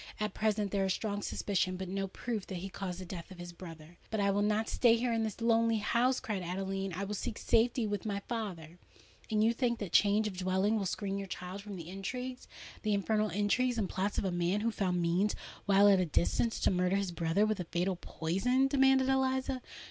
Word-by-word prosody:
At 210 Hz, -2 st, -1 dB
present 210 Hz, -2 st, 0 dB
there 200 Hz, -1 st, +1 dB
is 190 Hz, -, +1 dB
strong 205 Hz, -2 st, -3 dB
suspicion—but 185 Hz, -2 st, -1 dB
no 195 Hz, +1 st, -2 dB
proof—that 210 Hz, -1 st, -4 dB
he 185 Hz, +2 st, -5 dB
caused 185 Hz, -2 st, -5 dB
the 185 Hz, -, -6 dB
death 170 Hz, -1 st, -7 dB
of 190 Hz, -, -11 dB
his 175 Hz, 0 st, -8 dB
brother." 165 Hz, -1 st, -11 dB
"But 220 Hz, -, -2 dB
I 200 Hz, 0 st, +3 dB
will 200 Hz, +1 st, +1 dB
not 210 Hz, +1 st, +1 dB
stay 235 Hz, -2 st, +4 dB
here—in 230 Hz, -1 st, 0 dB
this 220 Hz, -1 st, -3 dB
lonely 230 Hz, -1 st, +3 dB
house," 240 Hz, +4 st, +2 dB
cried 210 Hz, -7 st, -3 dB
Adeline: 195 Hz, +2 st, -3 dB
"I 185 Hz, +3 st, -3 dB
will 200 Hz, +1 st, -3 dB
seek 210 Hz, +2 st, -4 dB
safety 235 Hz, +1 st, +2 dB
with 205 Hz, -2 st, -2 dB
my 205 Hz, -2 st, -2 dB
father!" 180 Hz, -8 st, -5 dB, 0.5 s
"And 220 Hz, +2 st, +3 dB
think 235 Hz, -2 st, 0 dB
you 205 Hz, -, -2 dB
that 175 Hz, -, -10 dB
change 210 Hz, +1 st, +4 dB
of 200 Hz, -, -5 dB
dwelling 190 Hz, +3 st, +1 dB
will 200 Hz, -3 st, 0 dB
screen 200 Hz, +1 st, -2 dB
your 195 Hz, -, -5 dB
child 185 Hz, +1 st, -6 dB
from 205 Hz, -1 st, -8 dB
the 170 Hz, -3 st, -8 dB
intrigues—the 220 Hz, +3 st, -6 dB
infernal 215 Hz, +2 st, +1 dB
intrigues 235 Hz, +5 st, +1 dB
and 210 Hz, -4 st, 0 dB
plots 195 Hz, +3 st, -2 dB
of -, -, 0 dB
a 190 Hz, -, 0 dB
man 175 Hz, +4 st, 0 dB
who 230 Hz, +1 st, +1 dB
found 185 Hz, -4 st, 0 dB
means, 180 Hz, +5 st, +1 dB, 0.3 s
while 200 Hz, 0 st, +6 dB
at 195 Hz, -2 st, +6 dB
a 185 Hz, -, +2 dB
distance, 175 Hz, +8 st, +1 dB
to -, -, +3 dB
murder 180 Hz, +1 st, +1 dB
his 200 Hz, -2 st, 0 dB
brother 170 Hz, +4 st, +1 dB
with 215 Hz, -2 st, -1 dB
a 180 Hz, -, -3 dB
fatal 180 Hz, +3 st, -1 dB
poison?" 195 Hz, +11 st, 0 dB
demanded 270 Hz, -1 st, +4 dB
Eliza. 265 Hz, -1 st, +1 dB
200 Hz, 215 wpm, -32 LUFS, 185-225 Hz, 0.5 s, while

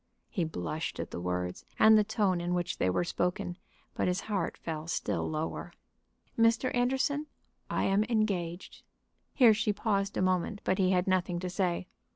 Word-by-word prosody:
He 180 Hz, -8 st, 0 dB
blushed 155 Hz, -, -4 dB
at -, -, -4 dB
the -, -, -5 dB
words 90 Hz, 0 st, -3 dB
and 220 Hz, 0 st, +7 dB
the 215 Hz, -, +6 dB
tone 200 Hz, -4 st, +1 dB
in 175 Hz, +1 st, -1 dB
which 175 Hz, +1 st, -2 dB
they 95 Hz, -, +2 dB
were 90 Hz, -, +1 dB
spoken, 175 Hz, 0 st, -2 dB, 0.3 s
but -, -, 0 dB
his 180 Hz, +1 st, 0 dB
heart 200 Hz, -6 st, -2 dB
fell 160 Hz, -1 st, -5 dB
still -, -, -1 dB
lower. 155 Hz, +1 st, -4 dB, 0.6 s
"Mr. 230 Hz, +3 st, +3 dB
Anderson, 265 Hz, +5 st, +1 dB, 0.4 s
I -, -, 0 dB
am 195 Hz, +2 st, +3 dB
engaged." 195 Hz, -6 st, -2 dB, 0.5 s
Here 240 Hz, -5 st, +7 dB
she 220 Hz, 0 st, +1 dB
paused 200 Hz, -1 st, -1 dB
a -, -, +1 dB
moment, 185 Hz, +3 st, 0 dB
but 185 Hz, -, 0 dB
he 185 Hz, -1 st, +3 dB
had 180 Hz, -1 st, +2 dB
nothing 185 Hz, -2 st, +1 dB
to 180 Hz, -1 st, -3 dB
say. 180 Hz, -2 st, 0 dB
185 Hz, 175 wpm, -30 LUFS, 175-215 Hz, 0.6 s, and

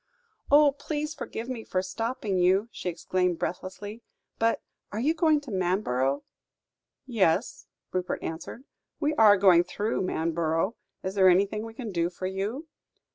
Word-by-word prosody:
"Oh! 290 Hz, 0 st, +7 dB
please 300 Hz, +2 st, -4 dB
forgive 240 Hz, -5 st, -6 dB
me 250 Hz, -3 st, -4 dB
for 185 Hz, -3 st, -1 dB
stopping 220 Hz, +1 st, -2 dB
you," 190 Hz, +5 st, +3 dB
she 180 Hz, -, -4 dB
exclaimed 180 Hz, +1 st, 0 dB
breathlessly, 205 Hz, +6 st, -5 dB, 0.4 s
"but 230 Hz, 0 st, +1 dB, 0.3 s
are 210 Hz, -, -3 dB
you 290 Hz, +7 st, +2 dB
going 315 Hz, -2 st, +3 dB
to 280 Hz, -5 st, -9 dB
Manborough?" 175 Hz, -8 st, 0 dB, 0.8 s
"Yes," 200 Hz, -10 st, +1 dB, 0.2 s
Rupert 180 Hz, 0 st, -2 dB
answered, 165 Hz, +9 st, -6 dB, 0.4 s
"we 300 Hz, 0 st, +1 dB
are 215 Hz, -6 st, +7 dB
going 180 Hz, -3 st, +6 dB
through 205 Hz, +5 st, -2 dB
Manborough. 165 Hz, +3 st, 0 dB, 0.3 s
Is 190 Hz, -, -3 dB
there 190 Hz, -2 st, +6 dB
anything 200 Hz, +4 st, +2 dB
we 225 Hz, 0 st, -9 dB
can 230 Hz, -4 st, -5 dB
do 170 Hz, -1 st, 0 dB
for 180 Hz, +1 st, -7 dB
you?" 200 Hz, -, -3 dB
200 Hz, 145 wpm, -27 LUFS, 180-235 Hz, 0.8 s, Oh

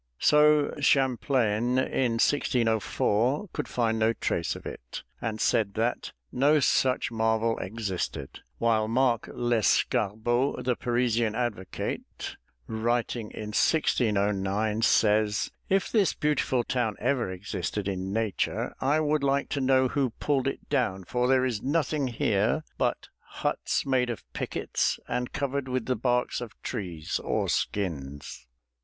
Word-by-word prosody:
'" -, -, -49 dB
So 150 Hz, -, +4 dB
Champlain, 125 Hz, -4 st, +2 dB
in 130 Hz, -2 st, +1 dB
1604, 120 Hz, -, +1 dB
could 150 Hz, -, -3 dB
find 115 Hz, -2 st, 0 dB
no 110 Hz, +1 st, +3 dB
trace 85 Hz, -6 st, -1 dB
of -, -, -10 dB
it, -, -, -7 dB, 0.2 s
and 110 Hz, -1 st, -3 dB
said 100 Hz, -3 st, +1 dB
that 115 Hz, +2 st, -1 dB, 0.2 s
"no 145 Hz, +4 st, +4 dB
such 130 Hz, -2 st, +2 dB
marvel 110 Hz, 0 st, +1 dB
existed," 95 Hz, -8 st, -4 dB, 0.2 s
while 110 Hz, -2 st, +2 dB
Mark 120 Hz, 0 st, +1 dB
Lescarbot, 120 Hz, +1 st, +1 dB
the 125 Hz, -1 st, +2 dB
Parisian 120 Hz, -2 st, 0 dB
advocate, 110 Hz, -7 st, -4 dB, 0.3 s
writing 115 Hz, 0 st, -1 dB
in 105 Hz, -, -7 dB
1609, 105 Hz, -5 st, +1 dB
says, 105 Hz, -2 st, +3 dB, 0.2 s
"If 195 Hz, 0 st, +1 dB
this 205 Hz, -7 st, +3 dB
beautiful 140 Hz, -4 st, +1 dB
town 115 Hz, -4 st, -1 dB
ever 130 Hz, -7 st, 0 dB
existed 95 Hz, +1 st, -4 dB
in 95 Hz, -1 st, -3 dB
nature, 110 Hz, -2 st, -1 dB
I 145 Hz, +4 st, +2 dB
would 150 Hz, -1 st, +1 dB
like 140 Hz, 0 st, +1 dB
to 140 Hz, -, -1 dB
know 130 Hz, 0 st, +4 dB
who 135 Hz, 0 st, 0 dB
pulled 135 Hz, -3 st, +1 dB
it 135 Hz, -, -4 dB
down, 95 Hz, 0 st, 0 dB
for 125 Hz, +6 st, 0 dB
there 130 Hz, 0 st, +3 dB
is 115 Hz, -5 st, -2 dB
nothing 150 Hz, -1 st, 0 dB
here 115 Hz, +3 st, +1 dB, 0.2 s
but -, -, -1 dB
huts -, -, -2 dB
made 130 Hz, -2 st, +1 dB
of 110 Hz, -7 st, -4 dB
pickets -, -, -1 dB
and 125 Hz, 0 st, -2 dB
covered 140 Hz, -1 st, -2 dB
with 130 Hz, -2 st, -2 dB
the 130 Hz, -, 0 dB
barks 125 Hz, +2 st, 0 dB
of 120 Hz, -3 st, -8 dB
trees 90 Hz, -10 st, -3 dB
or -, -, 0 dB
skins." 70 Hz, -9 st, -3 dB
120 Hz, 135 wpm, -27 LUFS, 105-130 Hz, 0.3 s, So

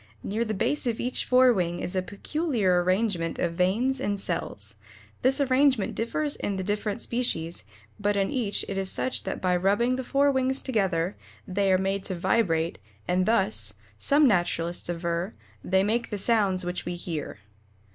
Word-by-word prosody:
Near 220 Hz, +4 st, -1 dB
the 215 Hz, -2 st, -3 dB
base 285 Hz, +7 st, 0 dB
of 230 Hz, -2 st, -1 dB
each 250 Hz, +1 st, -1 dB
fore 255 Hz, 0 st, +5 dB
wing 175 Hz, -4 st, -1 dB
is 180 Hz, -, -2 dB
a 185 Hz, -, +2 dB
peculiar 205 Hz, -, 0 dB
arrangement 185 Hz, -2 st, 0 dB
of 170 Hz, -1 st, -1 dB
veins 215 Hz, +10 st, +1 dB
and 205 Hz, -5 st, -1 dB
cells. -, -, -3 dB, 0.5 s
This 265 Hz, +2 st, +2 dB
arrangement 265 Hz, -5 st, +3 dB
differs 290 Hz, +6 st, 0 dB
in 200 Hz, -, -3 dB
the 190 Hz, -, -3 dB
different 205 Hz, +1 st, -2 dB
species, 175 Hz, -9 st, -1 dB, 0.4 s
but 205 Hz, 0 st, +1 dB
in 195 Hz, -1 st, +1 dB
each 220 Hz, -6 st, -1 dB
it 195 Hz, -1 st, -2 dB
is 190 Hz, -1 st, +4 dB
such 260 Hz, -, -1 dB
that -, -, -3 dB
by 180 Hz, -1 st, +1 dB
rubbing 205 Hz, +8 st, +2 dB
the 260 Hz, -, -3 dB
fore 280 Hz, +2 st, +3 dB
wings 265 Hz, 0 st, 0 dB
together 190 Hz, -7 st, 0 dB, 0.3 s
they 195 Hz, +1 st, +1 dB
are 185 Hz, -, +5 dB
made 195 Hz, +1 st, -1 dB
to 185 Hz, -, -2 dB
vibrate, 170 Hz, -3 st, +1 dB, 0.3 s
and 180 Hz, +1 st, +1 dB
thus, 220 Hz, -2 st, +1 dB, 0.2 s
some 290 Hz, 0 st, +4 dB
naturalists 175 Hz, -4 st, 0 dB
aver, 170 Hz, +3 st, -2 dB, 0.3 s
they 190 Hz, +1 st, +2 dB
make 230 Hz, +4 st, 0 dB
the 210 Hz, -, -3 dB
sounds 200 Hz, -3 st, +2 dB
which 180 Hz, 0 st, -3 dB
we 175 Hz, -, -4 dB
hear. 165 Hz, -7 st, -5 dB
200 Hz, 175 wpm, -27 LUFS, 180-240 Hz, 0.5 s, fore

